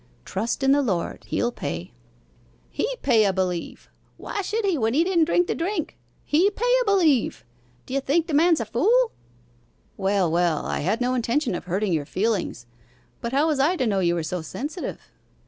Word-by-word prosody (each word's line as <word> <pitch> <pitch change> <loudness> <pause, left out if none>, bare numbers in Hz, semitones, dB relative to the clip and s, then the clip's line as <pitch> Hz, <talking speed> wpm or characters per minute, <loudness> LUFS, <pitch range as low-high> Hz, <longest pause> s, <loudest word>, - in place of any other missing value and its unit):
'Trust 230 +7 -2
in 270 - +4
the 285 +1 +4
Lord 190 -10 -2
he'll 240 - 0
pay.' 85 - -5 0.8
'He - - -1 0.2
pay 235 -5 +4
a 200 - +3
b'lieve! 185 -2 -3 0.3
why 410 - -4
should 425 +3 -2
he 385 -3 +2
when 225 -3 0
he 320 - +4
didn't 345 -3 +2
drink 350 +2 +2
the - - -1
drink? 340 -1 -3 0.3
He 340 +7 +3
pay 485 +5 0
a - - -1
b'lieve! 335 - +2 0.4
D'ye 270 +2 -1
think 300 +5 +1
the 330 - -5
man's 325 +2 +4
a - - -2
fool?' 450 - +2 0.9
'Well, 195 -3 +1
well, 170 -2 +1
I - - -2
had 205 +10 -1
no 250 +1 +1
intention 245 0 0
of 175 - -5
hurting 190 +2 -1
your 150 -3 0
feelings 195 - -1 0.6
but 235 - -3
how 280 +3 +2
was 310 -4 +1
I 305 +7 +3
to 260 - 0
know 200 -4 +1
you 175 -2 +2
were 170 - -2
so 175 +2 -3
sensitive? 290 - -6
255 Hz, 190 wpm, -24 LUFS, -, 0.9 s, in